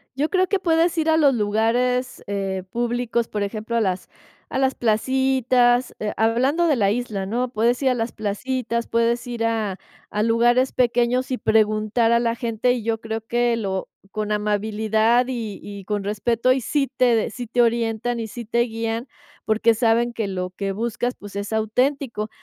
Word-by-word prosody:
Yo 295 +4 0
creo 370 -1 +2
que 400 - +1
puedes 335 0 +2
ir 320 0 +1
a 320 - +4
los 285 -4 +5
lugares, 240 +4 0
eh, 195 -2 -2
públicos, 240 -1 -1
por 210 -1 -2
ejemplo, 215 +3 -4
a 230 - +3
las 185 -2 -2 0.4
a - - -1
las 265 -1 +2
placitas, 250 +1 +2
eh, 210 -1 -2
hablando 255 +9 +2
de 310 -4 +3
la 205 -5 +2
isla, 210 -3 -2
¿no?, 245 +4 -1
puedes 240 +1 +1
ir 265 - +4
a - - +2
las 230 -1 -2
placitas, 235 +3 -2
puedes 235 +1 +1
ir 235 -2 -2
a 215 -4 -1 0.3
a 210 +1 -1
lugares 240 +3 +3
pequeños 245 +1 +1
y 255 - -1
preguntar 215 +1 +2
a 235 - +4
la 230 -1 +1
gente, 235 0 0
y 245 - -3
yo 225 -1 -1
creo 225 0 -4
que 240 +1 +1
lo 190 -3 -3 0.2
con 215 +1 -3
amabilidad 215 +3 +1
y 230 -5 -4
y 200 -2 -9
con 205 -1 -2
respeto, 230 +4 +1
y 255 0 +2
sí 275 +3 0
te 250 -2 +4
de 220 - 0
sí 245 +2 -6
te 240 +2 +1
orientan, 235 0 0
y 225 - -3
sí 235 +2 -7
te 235 +2 0
guían, 230 +1 -2 0.4
porque 225 +1 +3
saben 235 +1 +2
que 225 -3 -2
lo 185 -1 -3
que 195 +1 -4
buscas, 235 +4 -2
pues, 205 0 -11
es 200 +2 -4
auténtico. 225 +1 0
230 Hz, 185 wpm, -22 LUFS, 215-250 Hz, 0.4 s, los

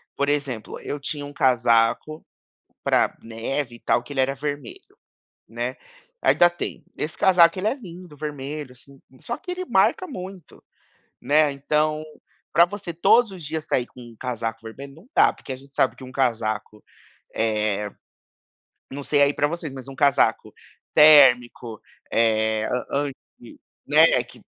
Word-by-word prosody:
por 140 0 0
exemplo, 140 -6 -3
eu 145 - -5
tinha 145 0 -5
um 145 - -10
casaco 120 +3 +2 0.6
para - - +2
neve, 120 +3 -4
e - - -15
tal, 120 - +1
que 145 - -13
ele 135 - -3
era 135 +1 0
vermelho, 150 - -7 0.5
né, - - -4 0.5
ainda 175 - +5
tenho, 175 - -6
esse 155 - -4
casaco 175 -2 +5
ele 205 - -1
é 255 - +1
lindo, 180 - -12
vermelho 145 -2 -6
assim, 135 +2 -16 0.2
só 240 - -4
que 370 - -8
ele 365 +1 -4
marca 370 - +2
muito, 190 - -10 0.6
né, 150 0 +3
então 150 +2 0 0.5
para 170 +2 +6
você 200 -2 -7
todos 225 +6 +4
os 180 -5 -9
dias 155 +1 -4
sair 125 -1 0
com 125 - -16
um 120 -2 -13
casaco 115 -3 -4
vermelho, 135 +5 -10
não 165 +7 -18
dá, - - +5
porque 135 - -9
a - - -5
gente 135 +1 -19
sabe 130 - +2
que 130 - -11
um 130 - -11
casaco, 110 -5 -2 0.5
eh, 105 -2 -1 1.0
não 140 +1 -7
sei 145 0 +3
aí 140 - +4
para 145 - +1
vocês, 155 -2 -5
mas 130 -1 -9
um 135 - -8
casaco 140 0 +2 0.4
térmico, 125 -6 +6 0.3
eh, 110 -1 +2 0.3
an 140 +1 0
anti - - -18 0.3
né, - - +5
que - - -17
140 Hz, 160 wpm, -23 LUFS, 120-155 Hz, 1.0 s, para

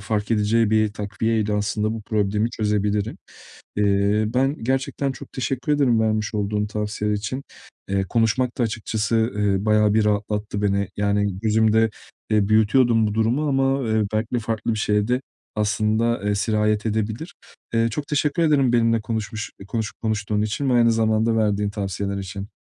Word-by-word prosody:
fark 105 +1 -2
edeceği 110 0 +2
bir 110 -1 +2
takviyeyle 105 +1 -1
aslında 105 +1 0
bu 110 -1 -6
problemi 105 +1 0
çözebilirim. 105 -1 -1 0.6
Eee, 100 +1 +2
ben 130 +5 +1
gerçekten 135 +2 -1
çok - - -12
teşekkür 130 +3 -2
ederim 130 -6 +3
vermiş 110 -1 0
olduğun 105 0 -1
tavsiyeler 105 0 -2
için. 130 +7 -4 0.4
Eee, 95 0 0
konuşmak 120 +2 +1
da - - +2
açıkçası, 110 +1 -1
eee, 100 -1 +1
bayağı 105 -1 +3
bir 110 - +3
rahatlattı 105 0 -1
beni. 100 -1 +1
Yani 100 -1 0
gözümde, 110 +1 +3 0.4
eee, 105 -2 +2
büyütüyordum 110 +1 +4
bu 105 - -2
durumu 120 +7 +1
ama, 135 -2 +1
eee, 110 0 +2
belkide 110 +3 -1
farklı 110 0 -2
bir - - -4
şeye 105 0 +1
de 125 +1 +1 0.3
aslında, 110 +2 0
eee, 105 0 +1
sirayet 105 0 +1
edebilir. 110 - -2 0.4
Eee, 115 0 +3
çok 145 +6 -4
teşekkür 150 +3 0
ederim 140 -6 +3
benimle 115 -1 +3
konuşmuş 110 0 -4
eee, 100 - -10
konuşup 110 +1 -4
konuştuğun 105 -1 -1
için 110 +6 -2
ve - - +3
aynı 115 -1 +5
zamanda 110 0 +2
verdiğin 105 -2 +1
tavsiyeler 100 0 -3
için. 95 +1 -6
110 Hz, 160 wpm, -22 LUFS, 105-115 Hz, 0.6 s, aynı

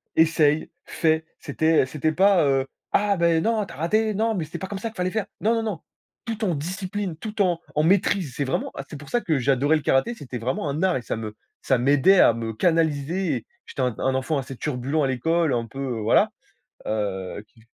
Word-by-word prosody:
essaye, 155 -1 +3 0.2
fais». 160 -1 +1
C'était 160 -3 +2
c'était 155 +3 -1
pas, 190 -1 +4
heu: 135 -1 +1 0.2
«Ah, 200 -1 +2
bah, 170 -1 +3
non, 220 0 +1
tu - - -12
as - - -12
raté. 215 +7 +1
Non 220 +2 0
mais 170 - -2
c'était 165 +3 -7
pas 190 - -5
comme 200 0 -5
ça 225 +3 -3
qu'il 220 - -18
fallait 180 0 -1
faire!». 220 -3 -1 0.2
Non, 225 +2 +3
non, 225 - -1
non, 210 -7 -3 0.5
tout 225 -1 -4
en 185 -5 +1
discipline, 185 +4 -4
tout 210 +3 -4
en 175 -3 +2
en 150 - +2
maitrise. 180 -5 +2
C'est 145 - -1
vraiment 130 - -2 0.3
pour 145 - -12
ça 240 - +1
que 155 - 0
j'adorais 140 +4 +2
le - - -5
karaté, 135 - +2
c'était 130 - -7
vraiment 130 +5 -2
un 155 +6 -2
art 185 -6 +3
et - - -5
ça - - -3
me 110 -1 -6 0.3
ça 130 -3 +2
m'aidait 145 +9 +5
à 115 - +7
me 115 -1 -4
canaliser 165 - +1
et 115 - -9 0.2
j'étais - - -5
un 125 -3 0
un 130 - 0
enfant 130 +4 0
assez 135 -1 -5
turbulent 140 +2 -1
à - - +2
l'école, 160 +5 +1
un 115 -1 0
peu, 125 +4 -10
heu, 125 -5 -3
voilà, 110 +2 +4 0.6
heu, 100 -1 -3
qui 110 +1 -24
155 Hz, 225 wpm, -24 LUFS, 130-190 Hz, 0.6 s, à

